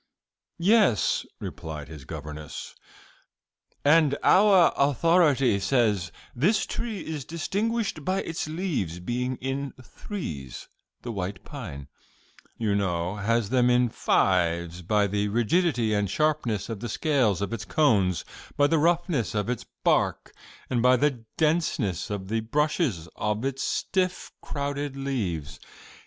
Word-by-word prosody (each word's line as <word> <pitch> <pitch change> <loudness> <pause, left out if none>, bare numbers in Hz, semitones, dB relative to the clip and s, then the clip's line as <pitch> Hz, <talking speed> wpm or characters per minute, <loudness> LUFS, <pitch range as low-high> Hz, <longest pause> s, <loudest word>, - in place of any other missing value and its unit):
"Yes," 185 - +3
replied 75 -3 -6
his 75 -4 -10
governess, 75 0 -7 1.1
"and 145 -1 +5
out 195 -3 +6
authority 140 - +3
says 100 -5 +1 0.2
this 190 - +2
tree 220 -6 -4
is 155 -3 -4
distinguished 200 - -2
by 190 +5 0
its 165 -1 -4
leaves 155 - -2
being 125 +7 -2
in 135 +2 -4
threes 80 - -7 0.4
the 120 - -4
white 95 -1 -4
pine, 80 - -8 0.7
you 110 -3 0
know, 90 -1 -1
has 115 +1 0
them 125 -1 +4
in 125 0 +3
fives 85 -4 +1
by 105 +4 +2
the 100 +1 0
rigidity 120 - +1
and 105 -2 +1
sharpness 145 -6 0
of 115 -3 -5
the 120 +2 -5
scales 125 - +1
of 100 +3 -3
its 110 -2 -4
cones, 100 - +2 0.3
by 145 - +5
the 160 +2 +3
roughness 165 - +1
of 105 +2 -1
its 125 - -5 0.2
bark, - - +1 0.3
and 120 -2 0
by 125 +1 +6
the 130 -3 0
denseness 150 - 0
of 100 -2 -4
the 115 +3 0
brushes 130 - 0
of 105 +3 -1
its 135 0 -2
stiff, 185 -1 -1
crowded 140 0 -3
leaves. 90 - -3
120 Hz, 130 wpm, -26 LUFS, 100-155 Hz, 1.1 s, out